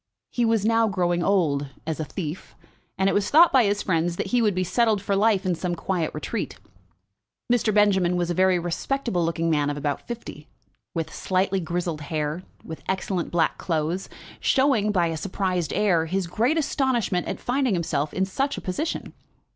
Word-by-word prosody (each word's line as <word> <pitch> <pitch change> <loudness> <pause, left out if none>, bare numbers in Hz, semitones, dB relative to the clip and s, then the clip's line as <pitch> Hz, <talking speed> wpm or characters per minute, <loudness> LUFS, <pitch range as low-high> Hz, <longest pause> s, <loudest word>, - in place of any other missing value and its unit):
He 240 - +1
was 225 -2 +2
now 225 0 +3
growing 175 -3 0
old, 160 -7 +1 0.2
as 160 0 -3
a - - -1
thief; 155 +2 -6 0.4
and 190 +1 +2
it - - +2
was 205 0 +1
thought 335 +3 +6
by 255 -4 +6
his 205 0 0
friends 170 -1 0
that - - -2
he 245 - +4
would 210 -4 +2
be 185 - +1
settled 220 +2 +2
for 200 +1 -1
life 205 -1 +2
in 185 - +2
some 175 +1 -2
quiet 175 -2 -2
retreat. - - -4 1.0
Mr. 230 -2 +2
Benjamin 195 -4 +3
was 175 0 0
a - - +1
very 185 +1 +3
respectable 175 +4 -1
looking 165 0 0
man 145 -2 +2
of 145 - -3
about 145 0 -3
fifty, 225 -10 -7 0.5
with 160 -1 -3
slightly 190 +1 0
grizzled 170 -2 -3
hair, 150 +2 -2 0.2
with 160 - -8
excellent 190 -2 -1
black 170 -2 +1
clothes, 165 +2 -2 0.3
showing, 260 -7 +2
by 180 -4 +2
a 165 -1 -2
surprised 180 -2 -2
air, 180 -6 +2
his 190 +2 -1
great 235 - +1
astonishment 260 - 0
at - - -4
finding 255 -4 0
himself 155 -3 -1
in 190 - 0
such 270 +9 -2
a - - -5
position. 295 - -3
185 Hz, 185 wpm, -25 LUFS, 165-210 Hz, 1.0 s, thought